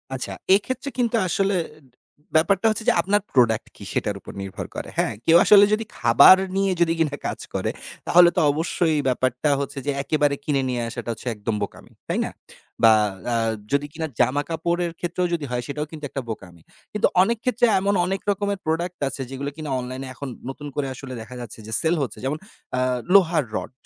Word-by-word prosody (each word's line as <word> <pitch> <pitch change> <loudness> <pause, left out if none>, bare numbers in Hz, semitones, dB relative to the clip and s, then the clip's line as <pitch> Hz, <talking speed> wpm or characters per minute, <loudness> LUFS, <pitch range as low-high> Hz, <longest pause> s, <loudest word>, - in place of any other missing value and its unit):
আচ্ছা, 130 - -5 0.2
এক্ষেত্রে 260 +6 -2
কিন্তু 240 -1 +1
আসলে 195 +2 +1 0.8
ব্যাপারটা 195 +6 +3
হচ্ছে 220 +1 -2
যে - - +5
আপনার 205 +1 +1
প্রোডাক্ট 115 -4 +3
কি - - -12
সেটার 105 - -1
উপর - - -10
নির্ভর 95 -1 -6
করে। - - -5
হ্যাঁ? - - +1
কেউ 165 +1 +7
আসলে 205 -1 +8
যদি 220 +1 0
খাবার 120 +9 +8 0.2
নিয়ে 195 -1 +2 0.3
কিনা 150 -3 +1
কাজ - - -4
করে, - - -1 0.4
তাহলে 175 0 +7
তো - - +2
অবশ্যই 160 +1 0
ব্যাপারটা 130 +3 0
হচ্ছে 140 0 -4
যে 145 - +1
একেবারে 145 -1 +1
কিনে 140 -3 +1
নিয়ে 120 -1 -1
আসাটা 120 - -6
হচ্ছে 115 +3 -11
একদম 105 +1 -3
বোকামি। - - -8 0.2
তাই - - -1
না? - - -5 0.5
বা 110 -1 +8 0.4
আ - - +1 0.4
যদি 140 +1 +1
কিনা 160 0 -3
জামাকাপড়ের 165 +5 0
ক্ষেত্রেও 175 +1 -1
যদি 155 -4 -1
হয় 120 0 -1
সেটাও 150 +1 -3
কিন্তু 155 -2 -9
একটা 135 - -4
বোকামি। 90 -6 -8 0.3
কিন্তু 210 - +3 0.2
অনেক 230 +3 0
ক্ষেত্রে 245 -1 +2
এমন 200 +1 +1
অনেক 195 +1 -2
রকমের 200 0 -2
প্রোডাক্ট 170 +3 -2
আছে 135 - -6
যেগুলো 140 +1 -4
কিনা 155 -2 -6
অনলাইনে 130 +2 -6
এখন 140 +1 -7 0.2
নতুন 145 +2 -7
করে 140 -2 -1
আসলে 130 0 -8
দেখা 120 +3 -10
যাচ্ছে 115 -1 -9 0.7
যেমন 145 +3 -1 0.4
আ - - +1 0.3
লোহার 170 -7 +5
রড, - - -6
155 Hz, 180 wpm, -23 LUFS, 130-185 Hz, 0.8 s, আসলে